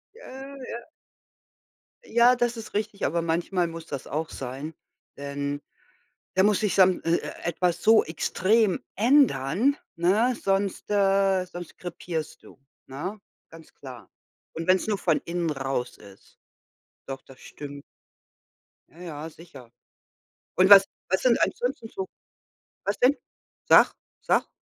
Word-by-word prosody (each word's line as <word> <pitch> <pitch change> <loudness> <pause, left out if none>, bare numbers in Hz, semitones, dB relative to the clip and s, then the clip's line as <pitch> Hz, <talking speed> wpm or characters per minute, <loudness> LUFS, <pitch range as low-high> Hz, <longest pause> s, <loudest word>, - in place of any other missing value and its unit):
Äh, 275 - -10
ja. 235 0 -7 1.2
Ja, 240 +2 +5
das 240 -1 0
ist 225 - -9
richtig, 210 -1 -2
aber 170 +4 0
manchmal 170 +2 0
muss 165 0 -8
das 140 -4 -6
auch 155 +2 -3
sein. 135 +5 -6 0.4
Denn 140 0 -4 0.7
da 190 - +4
muss 205 -1 +3
sich 210 -3 0
sam 185 -2 +5
e 165 +1 +2
äh, - - -6
etwas 175 +1 0
so 220 0 +6
extrem 190 +5 +1 0.2
ändern, 230 - +3 0.2
ne, 210 +9 +2
sonst, 195 0 -1
äh 195 -2 +3
sonst 175 -1 -10
krepierst 170 -3 -6
du, - - -16 0.3
ne, 180 +11 -6 0.3
ganz 165 0 -15
klar. 125 -6 -11 0.4
Und 165 0 -5
wen's 185 +2 +3
nur 210 -2 0
von - - +2
innen 170 -1 -1
raus 135 -3 -3
ist. 100 -1 -17 0.7
Doch, 135 -1 -6
das 135 - -16
stimmt. 145 -1 -9 1.1
Ja, 165 - -19
ja, 160 -3 -7
sicher. 145 -7 -14 0.9
Und 185 +1 +5
was 195 -1 +10 0.2
was 190 - +1
sind 245 -2 +3
ansonsten 245 -2 -1
so 190 -3 -5 0.8
was 200 - -1
denn? 260 +4 +4 0.5
Sag, - - +7 0.3
sag. - - +1
180 Hz, 135 wpm, -26 LUFS, 155-210 Hz, 1.2 s, was